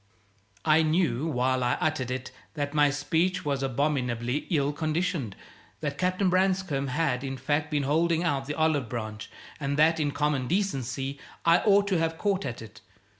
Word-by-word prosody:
I 155 +1 +5
knew, 155 -3 +1
while 130 -3 +1
I 125 - +2
uttered 155 -5 -1
it, 125 0 -4 0.2
that 145 -1 -2
my 145 -1 +4
speech 160 +6 0
was 140 -2 0
abominably 130 -2 -1
ill 145 -4 +1
conditioned; 155 - -1 0.5
that 140 -2 -3
Captain 185 +2 +1
Branscome 185 -6 +1
had, 135 -2 0
in 135 -1 -4
fact, 145 +3 -1
been 145 -2 0
holding 165 +4 +2
out 140 -5 -1
the 150 - -3
olive 155 -6 +1
branch, 110 -3 -5 0.3
and 140 -1 -2
that 160 +2 +4
in 150 -2 +1
common 145 -3 0
decency 135 - -2 0.3
I 170 +1 +6
ought 200 -1 +4
to 185 -4 +2
have 165 0 -1
caught 200 0 0
at 120 -2 -6
it. 110 -1 -13
145 Hz, 170 wpm, -27 LUFS, 135-165 Hz, 0.5 s, I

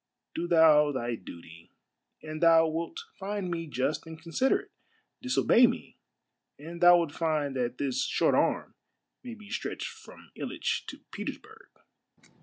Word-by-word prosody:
Do 170 +1 -3
thou 155 -3 +5
thy 120 -3 -3
duty, 85 -5 -11 0.5
and 155 0 -7
thou 165 -1 +6
wilt 165 +1 -4 0.2
find 195 -2 -3
me 165 -1 -3
just 140 +4 -2
and 160 0 -9
considerate. 255 +12 0 0.5
Disobey 255 -1 +4
me, - - -5 0.6
and 170 +4 -9
thou 175 0 +8
wilt 170 -4 -1
find 150 -4 -1
that 125 -1 -2
this 130 -2 -1
short - - +1
arm - - +1 0.5
may 245 -2 -7
be 215 -1 -14
stretched 235 - -4
from 445 -1 -15
Hitch - - -3
to - - -9
Petersburg." 440 +4 -8
165 Hz, 140 wpm, -29 LUFS, 145-190 Hz, 0.6 s, thou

